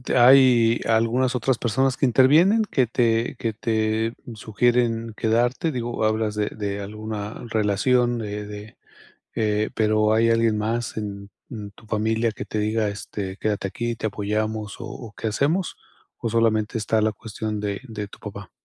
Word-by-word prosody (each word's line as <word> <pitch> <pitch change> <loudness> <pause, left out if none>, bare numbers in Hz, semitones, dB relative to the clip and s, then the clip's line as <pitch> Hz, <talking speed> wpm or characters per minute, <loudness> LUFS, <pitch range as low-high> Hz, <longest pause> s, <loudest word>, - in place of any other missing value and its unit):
¿Hay 120 -2 +6
algunas 115 +3 +2
otras 125 +1 +1
personas 130 +3 +1
que - - +1
intervienen, 155 - +5
que 130 - +1
te 115 0 +1
que 115 -2 -1
te 110 0 0 0.2
sugieren 115 +1 0
quedarte?, 120 +9 +1
digo, 120 -4 -3
hablas 110 -1 0
de 105 -1 0
de 100 -1 -4
alguna 105 0 -6
relación 120 +3 +2
de 105 -1 -4
de 105 +1 -10 0.6
eh, 105 -1 0
pero, 110 0 +2
hay 115 +1 +3
alguien 115 -1 +2
más 115 +2 -2
en 100 -1 -5 0.2
en 105 -4 -6
tu 110 - -19
familia 110 +1 0
que 105 - -7
te 105 - -4
diga: 110 0 0
"Este, 100 -1 -6
quédate 105 -2 -1
aquí, 120 +4 -3
te 110 - -2
apoyamos, 105 +1 -2
¿o 115 -6 -8
qué - - -4
hacemos?" 150 - 0 0.4
¿O 115 - -3
solamente 115 0 +1
está 110 +1 +1
la 110 0 +2
cuestión 110 0 -5
de 100 +1 -3
de 105 -2 -5
tu - - -14
papá? - - -9
110 Hz, 160 wpm, -23 LUFS, 105-120 Hz, 0.6 s, Hay